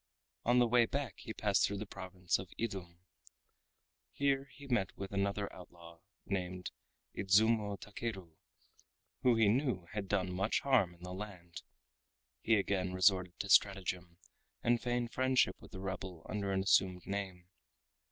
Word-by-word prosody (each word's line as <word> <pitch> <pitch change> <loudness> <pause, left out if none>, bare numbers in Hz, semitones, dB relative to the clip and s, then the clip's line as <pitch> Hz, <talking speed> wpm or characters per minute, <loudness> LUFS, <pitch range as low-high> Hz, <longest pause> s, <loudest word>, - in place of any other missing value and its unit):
On 120 +1 +4
the 125 - +6
way 120 0 +4
back 135 -7 -3
he 115 0 -7
passed 105 -3 +2
through 100 - -3
the 105 - -4
province 90 -2 -2
of 95 -1 -7
Idum. 95 -6 -4 1.1
Here 140 -1 +1
he 145 - -13
met 120 -8 0
with 95 0 -6
another 100 +1 0
outlaw 85 -2 -13 0.3
named 90 -2 -3 0.4
Idzumo 105 +1 +3
Takeru 100 -5 -6 0.9
who 125 -2 +4
he 115 -2 +4
knew 115 - +1
had 105 -2 -4
done 95 -2 0
much 95 +4 +1
harm 115 -11 +3
in 85 - -18
the 90 0 -6
land. 90 -4 -8 0.8
He 115 - +4
again 95 -2 0
resorted 90 -1 +3
to 100 - -7
stratagem, 90 -4 +2 0.5
and 120 0 +3
feigned 120 -1 -1
friendship 130 0 +2
with - - -14
the 95 - -8
rebel 95 -3 -5
under 100 -2 -2
an 95 0 +1
assumed 95 -2 +3
name. 95 -3 -4
100 Hz, 150 wpm, -34 LUFS, 90-115 Hz, 1.1 s, the